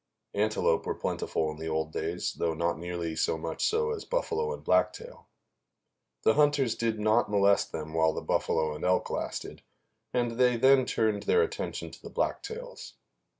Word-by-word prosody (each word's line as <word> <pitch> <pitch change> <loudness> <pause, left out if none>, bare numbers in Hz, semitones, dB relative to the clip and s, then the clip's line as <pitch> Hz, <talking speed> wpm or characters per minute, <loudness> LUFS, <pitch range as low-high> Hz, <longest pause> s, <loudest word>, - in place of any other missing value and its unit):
Antelope 105 -5 +1
were - - -1
plentiful 80 -1 -2
in 75 - -9
the 80 +1 -6
old 80 0 -1
days, 85 +3 -2
though 80 -1 -1
not 85 0 -1
nearly 85 -2 -4
so 80 - +1
much 80 +1 -4
so 460 +1 +2
as 440 -2 -4
buffalo 460 -2 -1
and 475 - -6
blacktail. 485 +1 0 1.0
The - - +5
hunters 145 -5 +3
did 115 -2 -1
not 110 +2 +3
molest 100 -1 +3
them 80 0 -6
while 80 0 +3
the - - -4
buffalo 80 -1 0
and 75 - -8
elk 90 0 +1
lasted, - - -4 0.5
and 120 -1 -1
they 125 -1 +4
then 130 +1 +5
turned 110 -2 +1
their 450 - +5
attention 445 0 -4
to - - -13
the - - -9
blacktails. - - -4
110 Hz, 170 wpm, -29 LUFS, -, 1.0 s, The